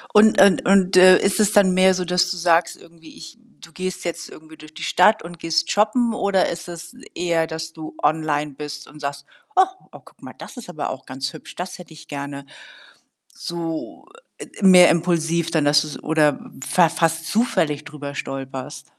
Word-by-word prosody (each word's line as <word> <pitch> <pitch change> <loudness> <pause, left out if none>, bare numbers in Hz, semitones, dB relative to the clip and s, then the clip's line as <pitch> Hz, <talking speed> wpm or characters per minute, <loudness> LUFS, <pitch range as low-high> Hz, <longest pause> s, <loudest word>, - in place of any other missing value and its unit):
Und 215 +1 +6
und 195 -2 +4
und, 195 -1 +3
äh, 185 0 +8
ist 195 +1 0
es 210 0 +2
dann 200 -3 +5
mehr 185 +1 +4
so, 180 0 -3
dass 180 0 +1
du 185 - -4
sagst 170 0 +1
irgendwie: 165 -1 -17
„Ich” 320 -7 -12 0.2
du 170 - -14
gehst 185 +1 -6
jetzt 170 - -5
irgendwie 155 0 -15
durch 155 0 -15
die 160 - -9
Stadt 210 +5 +3
und 170 0 -11
gehst 165 0 -1
shoppen? 225 +3 +1
Oder 200 -3 +1
ist 175 +1 -7
es 170 -1 -10 0.2
eher, 170 -2 0
dass 160 0 -7
du 155 -1 -10
online 150 -1 0
bist 150 +1 -8
und 150 - -15
sagst: 140 -1 -6 0.3
„Och 380 0 +3 0.2
oh, - - -13
guck - - -21
mal, - - -10
das - - -11
ist 235 -7 -10
aber 155 -4 -5
auch 130 +1 -9
ganz 135 +1 -5
hübsch, - - -12
das 180 +1 -7
hätte 175 -2 -13
ich 155 0 -15
gerne.” 140 -1 -7 0.9
So, 165 - -6 0.3
äh, - - -8
äh, - - -15
mehr 180 -2 +8
impulsiv 170 -1 0
dann, 160 -3 +1
dass 145 0 +4
du‘s 150 -1 -8
oder 150 -2 +2 0.3
fa 175 -2 +3
fast 165 0 -1
zufällig 160 -10 0
drüber 145 -2 -8
stolperst? 135 -1 -7
165 Hz, 195 wpm, -21 LUFS, 155-185 Hz, 0.9 s, äh